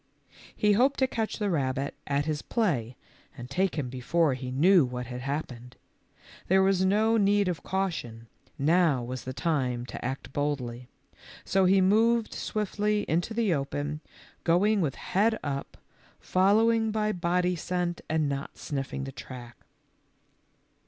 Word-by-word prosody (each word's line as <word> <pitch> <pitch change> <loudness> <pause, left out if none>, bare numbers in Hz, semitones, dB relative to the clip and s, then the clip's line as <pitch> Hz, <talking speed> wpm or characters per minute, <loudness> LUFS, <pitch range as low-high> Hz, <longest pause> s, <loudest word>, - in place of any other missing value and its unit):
He 210 - +3
hoped 255 +7 +3
to 265 - +3
catch 225 -4 -3
the 205 -3 -1
rabbit 135 -3 -1
at 140 0 0
his 155 -2 -2
play 135 - -1 0.4
and 120 -1 -7
take 190 0 +1
him 145 -5 -2
before 130 +5 +1
he 130 0 -5
knew 165 +7 +5
what 125 -1 -4
had 125 +1 -6
happened. 130 -3 -5 0.7
There 190 +1 +4
was 190 -1 +3
no 215 +4 +3
need 205 -1 +3
of 175 -4 -2
caution, 165 -12 -3 0.3
now 155 -3 +3
was 125 +1 -6
the 130 - -4
time 130 -4 -1
to - - -8
act 130 0 -5
boldly, 125 -4 -2 0.6
so 190 -1 +2
he 190 +1 +5
moved 225 +4 +3
swiftly 210 0 -1
into 175 +7 -1
the 220 -6 +2
open, 145 +1 -3 0.4
going 200 +5 +3
with 145 -6 -1
head 220 +4 +1
up, 140 -1 -4 0.4
following 220 +4 +3
by 215 0 0
body 180 -1 0
scent 175 +1 -2
and 155 -1 +1
not 140 0 -4
sniffing 135 -1 -4
the 135 - -5
track. 120 -2 -10
165 Hz, 145 wpm, -28 LUFS, 135-200 Hz, 0.7 s, knew